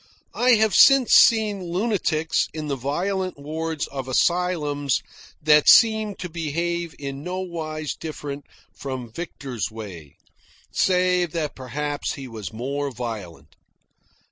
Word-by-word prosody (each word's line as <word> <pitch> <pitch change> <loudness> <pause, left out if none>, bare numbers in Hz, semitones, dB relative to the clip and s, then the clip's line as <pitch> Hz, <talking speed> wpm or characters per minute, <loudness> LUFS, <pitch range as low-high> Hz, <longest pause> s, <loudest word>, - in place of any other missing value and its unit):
I 250 +1 +4
have 220 -3 +3
since 275 +5 +6
seen 215 -4 +5
lunatics 175 -4 0
in 155 -1 -4
the 140 - 0
violent 185 +8 -2
wards 160 +2 -3
of 135 -2 -6
asylums 150 -2 +1 0.4
that 150 -1 +5
seemed 220 -3 +5
to 180 - -5
behave 170 +1 -3
in 140 -1 -6
no 180 +4 -4
wise 155 -4 -4
different 145 -2 -7 0.3
from 130 -4 -6
Victor's 135 - -5
way, 95 -10 -10 0.6
save 180 -2 +2
that 155 -3 -2
perhaps 145 +3 -3
he 135 -2 -8
was 110 -7 -7
more 140 +5 -3
violent. 115 -8 -7
155 Hz, 120 wpm, -23 LUFS, 135-180 Hz, 0.6 s, since